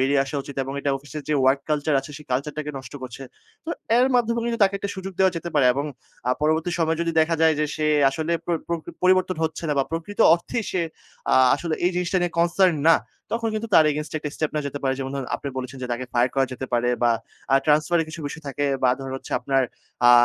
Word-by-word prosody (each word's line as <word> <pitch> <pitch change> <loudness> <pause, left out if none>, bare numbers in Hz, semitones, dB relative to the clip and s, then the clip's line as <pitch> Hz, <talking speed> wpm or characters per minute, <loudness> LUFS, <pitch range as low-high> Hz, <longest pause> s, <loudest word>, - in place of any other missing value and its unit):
বেরিয়ে 135 +1 +3
আসা 135 - -8
উচিত 140 - -9
এবং 135 - -5
এটা 140 - 0
অফিসের 145 +2 -8
যে 150 - +2
ওয়ার্ক 135 +1 +4
কালচার 150 -1 +1
আছে 135 - -11
সেই 150 - -12
কালচারটাকে 150 +3 -2
নষ্ট 130 -1 -11
করছে। 130 +1 -7 0.4
তো 330 - -4 0.3
এর 255 - +5
মাধ্যমে 235 -1 +2
কিন্তু 235 -1 -1
তাকে 195 - +1
একটা 200 0 -3
সুযোগ 190 0 -6
দেওয়া 190 -1 +4
যেতে 170 +1 -4
পারে 140 -3 +5
এবং 140 +2 -1 0.4
আ - - +4
পরবর্তী 160 +3 +2
সময়ে 160 -1 +1
যদি 165 0 -1
দেখা 165 +1 +2
যায় 160 -1 +5
যে - - +3
সে 155 - 0 0.2
আসলে 160 +4 -2
পর 170 -1 +1
প্রকৃ 170 0 -3
পরিবর্তন 185 0 +3
হচ্ছে 160 +1 -3
না - - +2
বা 135 - +3
প্রকৃত 165 +5 -5 0.2
অর্থেই 220 +6 -3
সে 185 - 0 0.5
আ - - +6 0.2
আসলে 160 +2 -2
এই 180 - +4
জিনিসটা 180 +1 +1
নিয়ে 175 -1 0
কনসার্ন 170 0 +3
না। 165 - +8 0.4
তখন 230 0 0
কিন্তু 220 +1 -3
তার 155 - +8
এগেইনস্টে 150 +1 -3
একটা 150 -1 -5
স্টেপ 155 - -1
নেওয়া 150 -1 -1
যেতে 145 - -6
পারে। 130 -1 +1
যেমন 135 0 -3
ধরুন 135 -3 -3
আপনি 140 - -6
বলেছেন 130 +1 -5
যে - - -2
তাকে 125 +2 -3
ফায়ার 120 +1 +3
করা 135 -1 +2
যেতে 130 +1 -5
পারে 120 0 +2
বা 120 - +5 0.4
আ - - +7
ট্রান্সফার 155 +3 +3
এর 160 - -2
কিছু 155 +1 -8
বিষয় 160 +3 -7
থাকে 145 +2 -2 0.2
বা 125 - +5
ধরেন 135 -1 -6
হচ্ছে - - -9
আপনার 135 -1 +2 0.5
আ - - +10
155 Hz, 240 wpm, -24 LUFS, 135-175 Hz, 0.5 s, আ